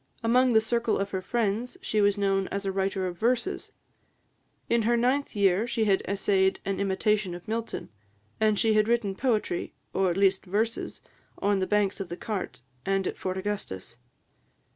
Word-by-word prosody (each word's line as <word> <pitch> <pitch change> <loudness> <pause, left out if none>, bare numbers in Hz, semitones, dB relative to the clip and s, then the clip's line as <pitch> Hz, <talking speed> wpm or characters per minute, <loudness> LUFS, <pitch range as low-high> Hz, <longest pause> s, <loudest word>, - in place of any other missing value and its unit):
Among 250 +2 +4
the 220 - +6
circle 235 0 +1
of 200 0 -2
her 190 - -2
friends 230 - -1
she 295 - 0
was 205 0 +3
known 195 -1 +1
as 200 0 -4
a 195 - 0
writer 190 0 -1
of 175 -1 -5
verses; 250 - 0 1.0
in 235 0 +2
her 235 +2 +2
ninth 255 +3 +1
year, 200 +2 +3
she 235 -2 0
had 195 -2 +3
essayed 190 -1 +2
an 195 0 -1
imitation 200 -1 +1
of 175 +4 -11
Milton; 225 +1 -3 0.5
and 215 -1 +3
she 220 +1 +3
had 215 0 +3
written 230 -4 +1
poetry, 215 -5 -1 0.2
or 190 -1 +2
at 175 - -1
least 195 -1 +3
verses, 220 +5 -2 0.4
on 200 0 +1
the 185 - 0
banks 210 -1 +1
of 195 -3 -5
the 175 - -5
Cart 200 - -4 0.2
and 195 0 0
at - - -2
Fort 185 0 -3
Augustus. 185 - -4
205 Hz, 180 wpm, -27 LUFS, 190-225 Hz, 1.0 s, the